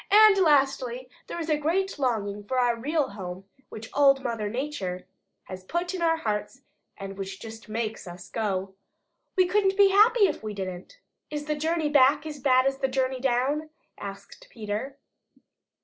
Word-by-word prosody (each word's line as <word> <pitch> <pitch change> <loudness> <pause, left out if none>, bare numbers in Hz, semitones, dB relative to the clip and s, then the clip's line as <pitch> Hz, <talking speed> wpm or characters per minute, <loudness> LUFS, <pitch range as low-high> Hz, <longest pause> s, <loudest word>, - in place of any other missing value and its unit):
And 425 0 +8
lastly 270 -6 +2 0.2
there - - -5
is 325 - -4
a 305 -2 +1
great 350 +3 -1
longing 210 -6 -1
for 255 +6 -3
our 245 -1 +3
real 290 +5 -1
home, 185 -2 -7 0.3
which 220 +1 -9
Old 275 -1 +4
Mother 225 -3 -2
Nature 210 -8 -4 0.4
has 185 0 -9
put 345 - -2
in 370 - -4
our 325 -1 +3
hearts 215 +1 -3 0.3
and 195 0 -8
which 195 0 -5
just 225 0 -10
MAKES 220 -2 -3
us 175 +1 -9
go. 195 -3 -2 0.6
We 370 - +5
couldn't 385 +1 +2
be 400 -1 +7
happy 430 +2 +6
if 315 - -4
we 215 -1 -5
didn't." 185 - -6 0.3
"Is 295 -1 -4
the 305 - -1
journey 315 +1 0
back 285 0 +4
as 300 -2 -6
bad 255 -1 +4
as 270 0 0
the 265 - +1
journey 260 0 -1
down?" 270 +4 0 0.3
asked 200 0 -10
Peter. 225 +5 -5
260 Hz, 170 wpm, -26 LUFS, 210-310 Hz, 0.6 s, And